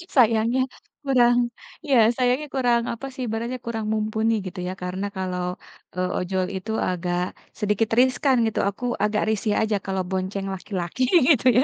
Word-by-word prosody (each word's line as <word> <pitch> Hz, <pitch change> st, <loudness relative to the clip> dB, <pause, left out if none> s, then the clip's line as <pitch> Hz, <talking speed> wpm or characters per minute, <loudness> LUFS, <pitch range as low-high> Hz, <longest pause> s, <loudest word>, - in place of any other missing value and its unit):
Sayangnya 230 Hz, 0 st, +4 dB, 0.4 s
kurang, 245 Hz, -3 st, +4 dB, 0.5 s
iya 275 Hz, -3 st, +3 dB, 0.2 s
sayangnya 255 Hz, +4 st, +1 dB
kurang 245 Hz, -3 st, +3 dB
apa 235 Hz, +3 st, -7 dB
sih 260 Hz, -, -7 dB
ibaratnya 230 Hz, +3 st, -3 dB
kurang 225 Hz, -2 st, -3 dB
mumpuni 220 Hz, +1 st, 0 dB
gitu 185 Hz, 0 st, -6 dB
ya. -, -, -2 dB
Karena 185 Hz, +2 st, -3 dB
kalau, 180 Hz, -1 st, -2 dB, 0.5 s
eee, 185 Hz, 0 st, 0 dB
ojol 185 Hz, 0 st, -1 dB
itu 200 Hz, +4 st, -5 dB, 0.2 s
agak 180 Hz, 0 st, -1 dB, 0.4 s
sedikit 210 Hz, +1 st, +1 dB
riskan 260 Hz, +1 st, +3 dB
gitu, 220 Hz, -, -1 dB
aku 200 Hz, +5 st, -10 dB, 0.2 s
agak 210 Hz, 0 st, +1 dB
risih 215 Hz, 0 st, 0 dB
aja 220 Hz, -1 st, +1 dB
kalau 190 Hz, -1 st, -1 dB
bonceng 190 Hz, +1 st, -2 dB
laki-laki 185 Hz, +3 st, -3 dB, 0.3 s
gitu 275 Hz, -7 st, +4 dB
ya. 255 Hz, -, +6 dB
220 Hz, 155 wpm, -24 LUFS, 190-245 Hz, 0.5 s, ya